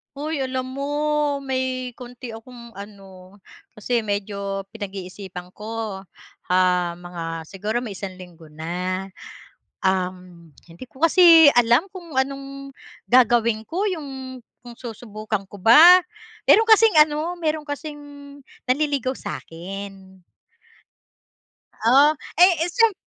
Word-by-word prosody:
Hoy 300 +1 -4
alam 260 -1 -2
mo 280 +2 -4 0.5
may 260 -1 -3
konti 245 -1 -9
akong 235 +1 -12
ano, 195 -2 -13 0.4
kasi 235 +3 -1
medyo 200 -1 -3
pinag-iisipan 190 -3 -8
ko, 215 -1 -6 0.5
ah, 180 -1 +2
mga 175 -1 -8 0.2
siguro 210 +8 -4
may 225 - -6
isang 190 -2 -7
linggo 175 -3 -14
na. 180 +5 -4 0.8
Um, 180 -3 -3 0.2
hindi 170 +9 -12
ko 265 - -10
kasi 330 -2 +8
alam 240 +5 +4
kung 345 -6 -10
anong 275 +1 -3 0.4
gagawin 235 -2 +3
ko, 375 +5 -2
yung 265 -7 -7 0.2
kung 240 -1 -11
susubukan 215 -3 -6
ko 205 - -11
ba. 330 - +8 0.5
Meron 445 +1 +6
kasing 440 -3 +6
ano, 305 +3 +2
meron 310 -2 -1
kasing 295 +1 -6 0.7
nanliligaw 275 -2 0
sa'kin. 190 +2 -9 1.7
Oh, 280 +5 +6 0.3
ay 360 +1 +8
eh 345 - -2
siyemp 455 -5 +2
235 Hz, 110 wpm, -22 LUFS, 190-275 Hz, 1.7 s, kasi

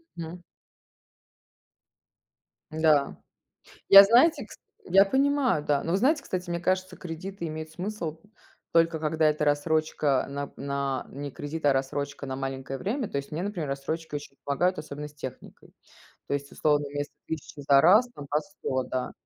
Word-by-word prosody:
Мгм. 170 +1 -7 2.3
Да. 155 -3 +2 0.7
Я, 195 0 +12
знаете, 255 +5 +4
кс - - -13 0.3
я 195 +2 +6
понимаю, 265 - +2
да, 145 -1 +1
но 165 - -2
вы 190 - +3
знаете, 285 +7 +2
кстати, 180 -1 -4
мне 170 0 -1
кажется, 185 +1 -1
кредиты 175 +2 -6
имеют 155 0 -6
смысл, 175 -2 -5 0.6
только 165 -1 +3
когда 155 0 +2
это 150 0 0
рассрочка, 145 -2 +1
нап 140 0 -5
на 140 -1 -2
не 145 +1 -6
кредит, 145 +3 -6
а 140 - +5
рассрочка 140 +2 -3
на 130 -1 -4
маленькое 135 0 -5
время. 225 +4 -2
То - - -4
есть 140 +1 -5
мне, 160 +4 -3
например, 190 -7 -3
рассрочка 150 +3 -4
ещё 145 -1 -7
помогает, 175 +7 0
особенно 150 0 -7
с 150 - -16
техникой. 130 -3 -10 0.6
То - - -2
есть, 140 0 -4
условно, 145 -1 +1
вместо 145 +1 -5
1000 155 -2 -6
за 140 0 +5
раз 210 - +6
там 145 - -9
по 145 - +2
100, 145 -8 -3
да. 130 0 -3
155 Hz, 160 wpm, -27 LUFS, 140-185 Hz, 2.3 s, Я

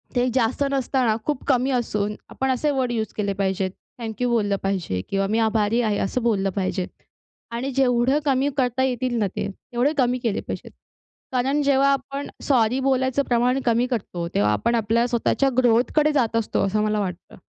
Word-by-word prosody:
ते 245 0 +2
जास्त 255 +2 +1
नसताना 260 -4 +1
खूप 295 -3 -2
कमी 260 -1 +2
असून, 210 -4 -1
आपण 265 0 -2
असे 260 +4 0
वर्ड 260 -3 0
यूज 220 -2 -2
केले 200 -2 0
पाहिजेत, 190 -1 -1 0.3
थँक्यू 230 +2 -2
बोललं 210 -4 +1
पाहिजे. 185 - -1
किंवा 195 0 0
मी 220 +3 +1
आभारी 220 +1 +2
आहे, 215 -3 0
असं 250 +6 -1
बोललं 200 -4 +1
पाहिजे. 190 -1 -1 0.7
आणि 245 +4 -3
जेवढं 260 +1 +2
कमी 275 0 +2
करता 255 -1 +1
येतील 255 -1 -1
ना, 205 - +2
ते - - -2
तेवढे 245 +7 -2
कमी 250 -2 +2
केले 220 -3 0
पाहिजेत. - - -7 0.6
कारण 270 +3 +1
जेव्हा 275 -1 +3
आपण 275 +1 -4 0.2
सॉरी 250 -2 +2
बोलायचं 260 0 +1
प्रमाण 245 +2 +2
कमी 240 +1 +2
करतो, 185 -8 -3
तेव्हा 105 +1 +3
आपण 105 - +1
आपल्या 230 +1 +1
स्वतःच्या 245 +3 +1
ग्रोथकडे 255 +5 +3
जात 240 -6 +1
असतो, 225 -3 +1
असं 210 +2 0
मला 215 0 0
वाटतं. 185 -3 -5
240 Hz, 175 wpm, -23 LUFS, 210-260 Hz, 0.7 s, जेव्हा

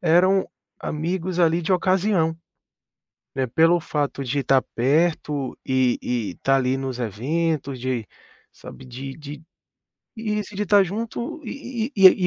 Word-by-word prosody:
eram 185 +2 +4 0.3
amigos 175 +3 -2
ali 170 0 +4
de 175 +3 0
ocasião, 185 -2 +2 1.0
né, 130 -1 0
pelo 165 +7 +4
fato 145 -3 -2
de 135 +2 -1
tá 135 0 +4
perto 145 +1 0
e 130 -2 +2
e 110 -7 -2
tá 135 0 +4
ali 130 0 +1
nos 130 -2 -4
eventos, 135 - -1
de 125 -4 -2 0.5
sabe, 130 - -12
de 135 +2 -7
de 150 0 -9 0.7
isso, 210 -2 -3
de 210 +1 -1
tá 205 +1 +6
junto 230 - -4
e 250 0 -4
e 190 -1 +7
160 Hz, 130 wpm, -23 LUFS, 130-190 Hz, 1.0 s, e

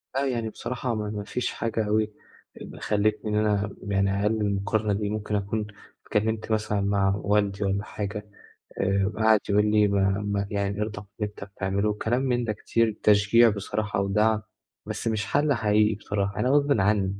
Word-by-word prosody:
آه، 135 +1 +1
يعني 120 -4 -1
بصراحة 125 +1 -3
ما 105 -1 -3
ما 105 -1 -4
فيش 125 +4 -2
حاجة 110 -1 -2
أوي 105 0 +1 0.5
اب - - -9
خلّتني 105 +1 0
إن - - 0
أنا 105 -1 +1 0.2
يعني 100 0 +1
أقلِّل 110 +1 +1
المقارنة 105 +1 0
دي 100 +1 -1
ممكن 105 0 -2
أكون 105 +1 -2 0.4
اتكلِّمت 110 +1 -1
مثلًا 110 -1 0
مع 100 -1 +2
والدي 100 -1 +1
والّا 100 +1 0
حاجة 105 0 -5 0.6
آآ 100 +1 +1
قعد 110 -1 +5
يقول 105 +1 +4
لي: 105 -1 +4
"ما 100 -1 +2 0.2
ما 100 -1 -1
يعني 100 0 -1
ارضى 105 -1 -4
باللي 105 -1 -1
أنت 105 - -10
بتعمله." 100 +1 -1
كلام 120 +4 0
من 125 -2 0
ده 110 -2 -1
كتير 110 +1 0
تشجيع 105 +3 +5
بصراحة 105 0 -2
ودعم 105 +2 +2 0.4
بس - - -4
مش 110 -1 0
حَل 145 0 +2
حقيقي 105 -2 +2
بصراحة 100 -1 -3
أنا 125 - +2
غصبٍ 145 +1 +3
عنّي، 100 0 +2
105 Hz, 175 wpm, -26 LUFS, 100-110 Hz, 0.6 s, قعد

